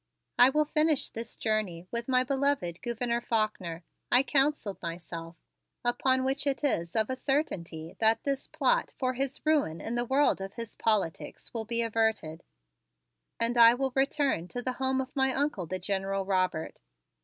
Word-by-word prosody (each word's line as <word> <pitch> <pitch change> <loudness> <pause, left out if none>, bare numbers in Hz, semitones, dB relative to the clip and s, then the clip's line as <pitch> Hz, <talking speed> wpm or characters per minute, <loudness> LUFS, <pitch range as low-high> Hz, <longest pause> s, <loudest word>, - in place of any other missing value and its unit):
"I 245 +1 +9
will 300 +3 +2
finish 305 -1 +2
this 230 0 -7
journey 210 -6 -1
with 235 0 -3
my 255 -1 +3
beloved 265 -10 0
Gouverneur 235 0 -1
Faulkner," 210 -8 -2 0.3
I 250 +2 +6
counseled 275 -8 0
myself, 165 -1 -7 0.5
"upon 260 +2 +2
which 270 +2 -1
it 275 +1 -1
is 170 - 0
of 220 +2 +2
a - - -1
certainty 175 - -2
that 225 0 +3
this 275 -1 -2
plot - - +1
for 255 -2 0
his 270 +3 -3
ruin 290 - +2
in 225 - -4
the 240 0 0
world 270 -4 +2
of 195 0 -7
his 230 -2 -7
politics 210 -7 -1
will 225 -2 -3
be 235 +1 0
averted, 220 -8 -1 1.0
and 235 +1 +1
I 230 0 +8
will 265 +1 -1
return 275 - +1
to 245 +6 -5
the 255 - -1
home 265 0 +2
of 260 +2 -8
my 265 -1 +2
Uncle, 275 - -1
the 185 - -3
General 195 +1 -2
Robert. 185 -4 -1
235 Hz, 165 wpm, -29 LUFS, 195-270 Hz, 1.0 s, I